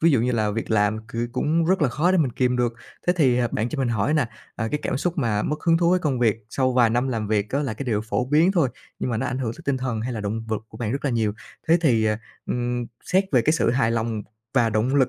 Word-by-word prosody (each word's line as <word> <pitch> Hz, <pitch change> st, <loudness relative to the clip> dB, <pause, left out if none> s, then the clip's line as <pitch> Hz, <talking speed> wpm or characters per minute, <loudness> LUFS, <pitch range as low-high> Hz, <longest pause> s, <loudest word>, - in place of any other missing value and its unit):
ví 165 Hz, -, +5 dB
dụ 135 Hz, -6 st, +3 dB
như 125 Hz, +2 st, +1 dB
là 110 Hz, -3 st, +1 dB
việc 115 Hz, +2 st, -4 dB
làm 110 Hz, 0 st, +2 dB
cừ 120 Hz, 0 st, -3 dB
cũng 160 Hz, +5 st, +1 dB
rất 185 Hz, 0 st, +2 dB
là 145 Hz, -, +4 dB
khó 155 Hz, +8 st, +1 dB
để 185 Hz, -, +3 dB
mình 135 Hz, -6 st, +1 dB
kìm 125 Hz, 0 st, +1 dB
được. 120 Hz, -1 st, +1 dB, 0.3 s
Thế 180 Hz, -, +5 dB
thì, 130 Hz, -7 st, +3 dB
à, 120 Hz, -1 st, +1 dB
bạn 110 Hz, +3 st, 0 dB
cho 150 Hz, -, -5 dB
mình 130 Hz, -, +1 dB
hỏi 115 Hz, +6 st, +1 dB
nà, 140 Hz, -7 st, +2 dB, 0.3 s
à, 110 Hz, 0 st, -2 dB
cái 150 Hz, -, 0 dB
cảm -, -, -1 dB
xúc 175 Hz, +3 st, -2 dB
mà 105 Hz, -6 st, +1 dB
mất 150 Hz, +1 st, -2 dB
hứng 165 Hz, -1 st, +4 dB
thú 170 Hz, 0 st, +3 dB
với 185 Hz, -, +4 dB
công 145 Hz, -8 st, -1 dB
việc 110 Hz, -3 st, +3 dB
sau 130 Hz, 0 st, +1 dB
vài 120 Hz, -3 st, +4 dB
năm 125 Hz, +3 st, +1 dB
làm 110 Hz, -4 st, -2 dB
việc 105 Hz, -1 st, 0 dB
á, 140 Hz, -, 0 dB
là 120 Hz, -6 st, -2 dB
cái 140 Hz, -, -5 dB
điều 110 Hz, -4 st, 0 dB
phổ 110 Hz, +3 st, -1 dB
biến 155 Hz, +8 st, +3 dB
thôi, 160 Hz, -9 st, +3 dB, 0.3 s
nhưng -, -, -2 dB
mà 115 Hz, -, 0 dB
nó 110 Hz, -, -1 dB
ảnh 125 Hz, +1 st, -2 dB
hưởng 120 Hz, -4 st, -2 dB
tới 170 Hz, -, -13 dB
tinh 140 Hz, -1 st, +1 dB
thần 125 Hz, -4 st, -2 dB
hay 120 Hz, +3 st, -3 dB
là 110 Hz, -, -4 dB
động 105 Hz, +2 st, -3 dB
vực 110 Hz, -2 st, -1 dB
của -, -, -12 dB
bạn 115 Hz, -1 st, -2 dB
rất 140 Hz, -, -3 dB
là 140 Hz, -, +1 dB
nhiều. 110 Hz, -3 st, +1 dB, 0.4 s
Thế 170 Hz, +2 st, +6 dB
thì, 120 Hz, -9 st, +3 dB
ờ, 105 Hz, 0 st, +2 dB, 0.3 s
ừm, 120 Hz, -1 st, -2 dB, 0.2 s
xét 190 Hz, +2 st, +2 dB
về 125 Hz, -4 st, +5 dB
cái 155 Hz, -, +3 dB
sự 155 Hz, -, +2 dB
hài 120 Hz, -2 st, +2 dB
lòng 115 Hz, -2 st, -1 dB, 0.3 s
và 120 Hz, -4 st, +4 dB
động 110 Hz, +5 st, +1 dB
lực 135 Hz, -3 st, +4 dB
125 Hz, 300 wpm, -24 LUFS, 115-145 Hz, 0.4 s, Thế